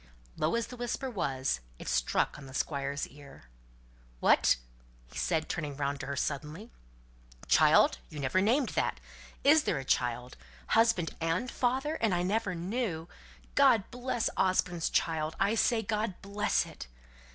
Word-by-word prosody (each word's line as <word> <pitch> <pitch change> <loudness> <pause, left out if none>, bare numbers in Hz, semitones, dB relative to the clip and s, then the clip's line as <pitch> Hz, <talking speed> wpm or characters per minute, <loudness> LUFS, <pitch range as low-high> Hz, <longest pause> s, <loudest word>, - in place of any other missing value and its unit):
Low 155 +6 0
as 235 0 0
the 250 - -10
whisper 245 +2 -3
was, 135 - -1 0.2
it - - -10
struck - - +1
on 135 - -11
the 130 - -10
Squire's 140 -1 -2
ear. 140 -1 -14 0.8
"What?" - - +5 0.6
said 160 -3 0
he, - - -17
turning 150 -4 -4
round 140 0 -1
to 135 - -6
her 140 - -3
suddenly, 150 - -4 0.4
" - - -22
child? - - +5
You 150 - -10
never 140 +7 +1
named 245 +6 +2
that? - - -1 0.4
Is 300 +3 +6
there 165 - +1
a 135 - -5
child? 125 0 -1 0.3
Husband 225 -7 +3
and 165 +10 0
father, 265 +5 0
and 220 -5 +2
I 175 - 0
never 200 0 0
knew! 175 -2 -3 0.5
God 260 -8 +4
bless 245 -1 -1
Osborne's 180 -3 +1
child! 160 -1 0
I 200 +2 +3
say, 225 0 +2
God 215 -2 -2
bless 205 +2 0
it!" - - -10
180 Hz, 155 wpm, -30 LUFS, 140-225 Hz, 0.8 s, Is